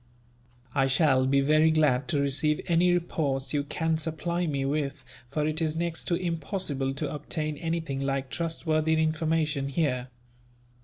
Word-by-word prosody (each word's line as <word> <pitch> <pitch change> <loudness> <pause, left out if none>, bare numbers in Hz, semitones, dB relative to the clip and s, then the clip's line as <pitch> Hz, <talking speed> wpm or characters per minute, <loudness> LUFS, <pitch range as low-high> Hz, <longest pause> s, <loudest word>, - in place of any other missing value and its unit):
"I 135 -1 +3
shall 135 -2 +3
be 140 +1 +3
very 155 +3 +4
glad 150 -4 +2
to 150 - +1
receive 140 +2 +1
any 175 +1 +3
reports 155 -6 -1
you 145 -1 +1
can 160 +2 -1
supply 170 +2 -2
me 140 -3 -1
with, 140 -1 -2 0.3
for 150 +3 -1
it 155 +1 -1
is 155 -1 0
next 170 0 -2
to 175 - +1
impossible 165 -5 -2
to 145 +1 -3
obtain 155 +1 -3
anything 165 -4 -2
like 135 -1 -2
trustworthy 160 -1 0
information 155 -2 0
here. 130 -4 0
155 Hz, 150 wpm, -28 LUFS, 140-165 Hz, 0.3 s, very